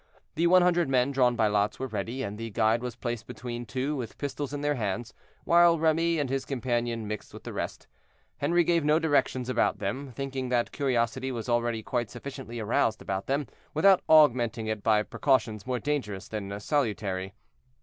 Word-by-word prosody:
The 170 - +2
one 180 +1 +6
hundred 175 -4 +2
men 130 +1 +2
drawn 125 -3 +3
by 110 - +2
lots 105 0 +1
were 130 - -3
ready, 115 +3 -4
and 100 -3 -4
the 115 0 -4
guide 110 +1 +2
was 125 -1 -5
placed 120 -2 -4
between 120 0 -6
two, 135 +5 -2
with 120 -5 -6
pistols 145 0 -4
in 145 -1 -4
their 145 0 +1
hands, 115 -2 -3 0.3
while 170 0 +5
Remy 165 +1 +2
and 145 -3 0
his 135 +1 -1
companion 120 -4 -2
mixed 105 0 -6
with - - -10
the - - -7
rest. - - -4 0.6
Henri 170 +4 +3
gave 170 -1 +2
no 150 +1 +4
directions 145 -5 +1
about 125 -2 +1
them, 135 0 -4
thinking 135 0 -4
that 120 -1 +1
curiosity 130 -1 0
was 115 -2 -5
already 120 -2 0
quite 120 -2 -2
sufficiently 125 -2 -7
aroused 110 0 +1
about 95 -1 -4
them, 140 +2 0 0.3
without 190 +4 +5
augmenting 120 -7 +5
it 110 -1 -2
by 105 0 +3
precautions 115 -2 0
more 125 -1 0
dangerous 120 -7 -3
than 100 -2 -5
salutary. 105 -7 -1
125 Hz, 185 wpm, -28 LUFS, 110-145 Hz, 0.6 s, one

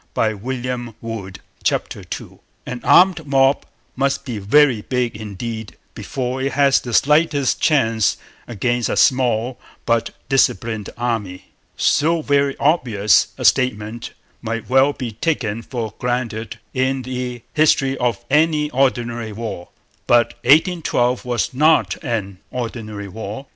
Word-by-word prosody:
CHAPTER 110 - +2
II 125 +4 -4
OPPOSING 120 -2 -5 0.7
FORCES - - -3 0.3
An 125 -1 -6
armed 175 -4 +5
mob 135 0 +2 0.3
must 140 +1 0
be 120 -6 -4
very 120 +3 +4
big 125 0 -2
indeed 110 -2 -6 0.2
before 130 0 -4
it 135 0 -1
has 140 -1 +4
the 120 - -7
slightest 150 -2 +2
chance 115 - +2 0.3
against 120 +1 -1
a - - -1
small 125 -1 +2 0.3
but 115 -1 +1 0.2
disciplined 115 -5 +1
army. 115 -7 -3 0.3
So 160 +3 +2
very 140 -1 +1
obvious 120 -10 +3
a - - -4
statement 115 -1 +1 0.3
might 115 -1 -4
well 135 +2 +4
be 125 -5 -5
taken 115 -3 -2
for 115 -3 -5
granted 120 -4 -3 0.2
in 130 0 0
the 125 -1 -5
history 140 -3 +3
of 120 -1 -1
any 150 0 +2
ordinary 120 -4 0
war. 105 -5 -6 0.4
But 120 -1 +4
'1812' 145 -5 +3
was 120 +1 -1
not 155 +5 +2
an 100 -5 -3
ordinary 110 -4 -5
war. 110 +6 -7
125 Hz, 125 wpm, -20 LUFS, 115-135 Hz, 0.7 s, armed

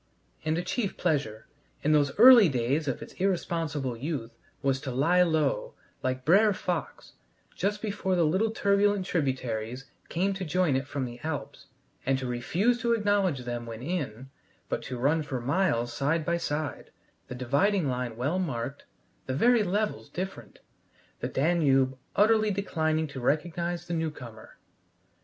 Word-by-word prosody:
And 155 +1 0
a 175 - -1
chief 200 +2 -2
pleasure, 135 -11 -1 0.4
in 155 - +2
those 145 -2 +2
early 235 -4 +9
days 135 +4 0
of 135 - -2
its - - -12
irresponsible 165 -8 -1
youth, 125 -2 -4 0.3
was 135 -1 +1
to 135 - -4
lie 160 +8 +3
low, 180 - +1 0.3
like 130 0 -2
Brer 200 +6 +5
Fox, 175 -5 -4 0.4
just 205 +3 -1
before 200 -3 -1
the 175 - +3
little 190 +8 +2
turbulent 200 -2 +2
tributaries 130 - -2 0.2
came 190 +4 0
to 190 0 -5
join 175 -3 +1
it 135 +1 -1
from 140 -2 -3
the 120 0 -8
Alps, 145 -3 -5 0.4
and 135 0 +1
to 130 - -4
refuse 175 - 0
to 235 0 +2
acknowledge 205 - +1
them 120 -1 -4
when 115 +1 -7
in, 135 -6 -4 0.4
but - - -1
to 130 - -6
run 145 +6 +2
for 135 -4 -4
miles 130 -3 0
side 155 +3 0
by 170 +1 +1
side, 150 -2 -3 0.4
the 125 - -6
dividing 145 +9 +1
line 125 -3 -3
well 145 +9 0
marked, 135 -5 -4 0.4
the 130 - -1
very 240 - +4
levels 210 +2 -1
different, 190 +2 -6 0.6
the - - -2
Danube 135 -4 +2 0.2
utterly 215 +1 +4
declining 160 -5 0
to 140 -3 -7
recognize 170 +5 -1
the 175 - -4
new 160 -1 0
comer. 115 -7 -12
155 Hz, 155 wpm, -28 LUFS, 130-185 Hz, 0.6 s, early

